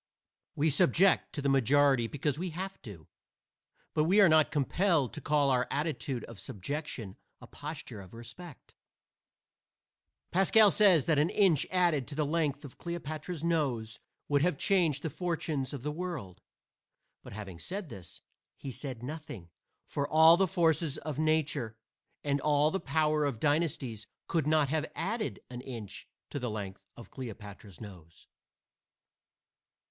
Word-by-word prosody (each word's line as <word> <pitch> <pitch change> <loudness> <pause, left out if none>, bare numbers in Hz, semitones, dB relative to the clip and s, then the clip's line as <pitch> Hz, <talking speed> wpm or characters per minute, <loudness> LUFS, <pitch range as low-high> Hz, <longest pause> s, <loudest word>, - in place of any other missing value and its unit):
We 155 +2 +2
submit 170 +7 +3
to 145 - -3
the 140 - +2
majority 135 -1 +3
because 145 +2 -2
we 180 +1 -2
have 190 +4 -6
to. 95 - -11 0.9
But 155 - +2
we 190 +6 +4
are 200 - +8
not 155 -1 +5
compelled 150 - +1
to - - -7
call 145 -2 +2
our 125 -1 +2
attitude 140 -4 -2
of 115 -4 -10
subjection 110 - -5 0.2
a - - -12
posture 145 -8 -8
of 95 +3 -13
respect. 125 +7 -11 1.6
Pascal 200 +3 +5
says 185 -9 +5
that 155 -3 +3
an 155 +3 +3
inch 185 -9 +3
added 175 -8 +2
to 140 - -6
the 150 0 0
length 150 -2 -1
of 135 - -12
Cleopatra's 165 -1 -5
nose 130 -9 -1 0.3
would 145 -1 +2
have 170 -2 +1
changed 165 -7 +2
the 160 - -2
fortunes 160 -5 -2
of 140 -4 -7
the 150 - -2
world. 150 - -6 0.8
But - - -11
having 100 -5 -8
said 190 - -5
this, 95 -8 -10 0.4
he 135 - -7
has 125 - -11
said 130 -5 -6
nothing, 125 - -7 0.3
for 140 -1 -2
all 160 +2 +7
the 190 +2 +2
forces 165 -4 +1
of 150 -2 -5
nature 150 -7 0 0.5
and 140 -1 0
all 150 0 +3
the 195 - -1
power 155 -3 +1
of 140 -6 -1
dynasties 145 -7 -1 0.2
could 160 -4 0
not 155 -2 +3
have 155 +1 -1
added 215 +6 -3
an 125 0 -6
inch 115 -6 -8 0.2
to 145 - -3
the 125 -2 -3
length 100 -2 -6
of 120 - -12
Cleopatra's 105 -6 -9
nose. 90 -6 -12
145 Hz, 150 wpm, -31 LUFS, 125-165 Hz, 1.6 s, are